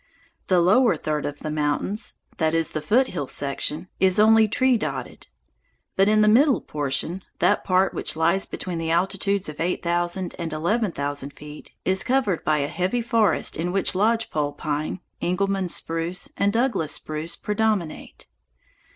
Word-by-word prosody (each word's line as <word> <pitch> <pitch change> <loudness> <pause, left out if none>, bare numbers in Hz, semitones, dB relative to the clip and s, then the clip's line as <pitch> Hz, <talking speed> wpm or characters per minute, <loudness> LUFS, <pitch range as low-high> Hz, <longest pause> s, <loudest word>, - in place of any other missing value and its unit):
The 185 -2 +4
lower 215 +8 +4
third 150 -1 -2
of 145 0 -7
the 155 - -4
mountains, 155 +8 -1 0.2
that 160 -1 +1
is, 165 -1 +1
the 155 - -3
foothill 185 - +1
section, 145 +5 -3
is 190 +1 +3
only 220 +1 +6
tree 255 +4 +2
dotted. 135 - -4 0.7
But 195 +1 +4
the 215 0 +4
middle 260 +6 +5
portion, 150 +5 -1 0.2
that 205 - +2
part 185 0 +2
which - - -1
lies 170 +4 +1
between 175 -3 -5
the 165 0 -3
altitudes 195 +3 0
of 155 -1 -8
eight 175 +2 -1
thousand 175 +1 -1
and 165 -2 -3
eleven 200 +7 0
thousand 145 -1 -4
feet, 150 +1 -12
is 190 0 +2
covered 250 -9 0
by 155 - +2
a 140 -1 0
heavy 185 +10 -1
forest 225 -3 +2
in 175 +3 -2
which 195 +1 +2
lodge 225 +4 +1
pole 145 -1 -1
pine, 150 +3 -3 0.2
Engelmann 195 +1 0
spruce, 165 +2 -2
and 200 - +1
Douglas 225 - 0
spruce 155 +2 -5
predominate. 210 -5 -2
180 Hz, 160 wpm, -24 LUFS, 155-210 Hz, 0.7 s, only